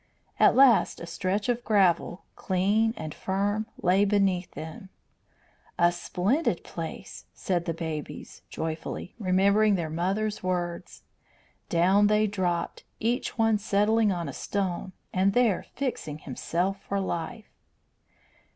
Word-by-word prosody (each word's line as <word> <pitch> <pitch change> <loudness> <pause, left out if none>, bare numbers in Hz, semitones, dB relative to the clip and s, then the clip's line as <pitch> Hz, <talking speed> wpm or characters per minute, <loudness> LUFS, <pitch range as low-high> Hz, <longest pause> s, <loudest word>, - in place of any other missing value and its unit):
At - - +6
last 260 -4 +5
a - - -6
stretch 185 +4 -2
of 240 -1 0
gravel, 190 -4 +2
clean 205 +5 +1
and 155 - -5
firm, 205 +3 -1 0.2
lay 185 +3 +4
beneath 195 -3 +1
them. 160 +4 -8 0.9
"A 175 0 +4
splendid 200 - -1
place," - - -7
said 175 -2 -1
the 165 - -1
babies, 160 -3 -6
joyfully, 160 +3 -5
remembering 200 +2 +3
their 165 -4 -3
mother's 195 +6 -1
words. 175 -1 -3 0.7
Down 190 +4 +4
they 210 +1 +3
dropped, 180 -4 -2 0.2
each 235 +3 -1
one 225 -2 +3
settling 210 +1 +2
on 175 -3 -3
a - - -5
stone 190 -2 -3 0.2
and 195 +1 +2
there 235 -5 +2
fixing 240 - -3
himself 175 +7 -2
for 200 - -2
life. 195 +4 -4
195 Hz, 125 wpm, -27 LUFS, 175-210 Hz, 0.9 s, At